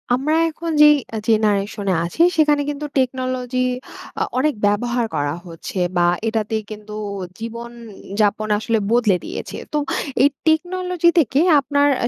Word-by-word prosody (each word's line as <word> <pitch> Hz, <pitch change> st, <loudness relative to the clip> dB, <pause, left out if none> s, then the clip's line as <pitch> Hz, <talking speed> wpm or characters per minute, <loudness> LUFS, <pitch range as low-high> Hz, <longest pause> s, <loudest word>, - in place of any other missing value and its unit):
আমরা 290 Hz, +5 st, -1 dB, 0.2 s
এখন 330 Hz, +1 st, -5 dB
যেই 300 Hz, 0 st, +8 dB, 0.2 s
এ -, -, -1 dB
জেনারেশনে 205 Hz, -2 st, +1 dB
আছি, 175 Hz, -, -2 dB, 0.2 s
সেখানে 295 Hz, -2 st, +4 dB
কিন্তু 295 Hz, +1 st, -4 dB
টেকনোলজি 255 Hz, -1 st, -1 dB, 0.6 s
অ -, -, +4 dB
অনেক 300 Hz, +3 st, +2 dB
ব্যবহার 235 Hz, +4 st, +1 dB
করা 145 Hz, 0 st, -1 dB
হচ্ছে। 165 Hz, +3 st, -8 dB, 0.2 s
বা, 175 Hz, -, +4 dB, 0.2 s
এটাতে 220 Hz, 0 st, -1 dB, 0.2 s
কিন্তু 210 Hz, 0 st, -9 dB, 0.5 s
জীবন 235 Hz, +1 st, -6 dB, 0.4 s
উ -, -, -5 dB
যাপন 210 Hz, +1 st, +1 dB
আসলে 225 Hz, +2 st, 0 dB
বদলে 230 Hz, -5 st, +3 dB
দিয়েছে। -, -, -6 dB, 0.2 s
তো -, -, +2 dB, 0.5 s
এই 285 Hz, -, +6 dB, 0.2 s
টেকনোলজি 355 Hz, +2 st, +2 dB
থেকে 275 Hz, -2 st, +2 dB, 0.2 s
আপনার 285 Hz, +1 st, +2 dB, 0.2 s
আ -, -, +2 dB
245 Hz, 145 wpm, -20 LUFS, 215-295 Hz, 0.6 s, যেই